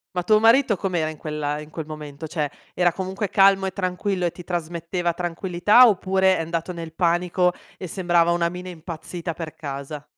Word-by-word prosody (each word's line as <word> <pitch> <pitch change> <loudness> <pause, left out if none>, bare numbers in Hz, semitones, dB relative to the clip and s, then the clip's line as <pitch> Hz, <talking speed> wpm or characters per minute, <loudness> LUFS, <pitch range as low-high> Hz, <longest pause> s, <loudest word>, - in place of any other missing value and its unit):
Ma 180 - 0
tuo 215 +2 +4
marito 230 0 +5
com'era 175 -4 -1
in 155 - -8
quel 150 0 -5
ehm 150 0 -2
in 150 - -11
quel 160 0 -6
momento? 150 -1 -8
Cioè, 150 -3 -2 0.2
era 175 -1 +3
comunque 190 +2 -4
calmo 195 -1 +4
e - - -3
tranquillo 185 0 -2
e 170 - 0
ti 180 - -11
trasmetteva 170 0 -2
tranquillità 180 +6 +4
oppure 190 -2 +2
è - - -1
andato 165 +2 -3
nel 165 -2 -7
panico 180 +1 +1 0.2
e 185 - -6
sembrava 175 -1 +2
una 170 0 +1
mina 180 +1 -7
impazzita 170 0 -6
per 160 -2 -6
casa? 140 0 -6
175 Hz, 190 wpm, -23 LUFS, 160-185 Hz, 0.2 s, marito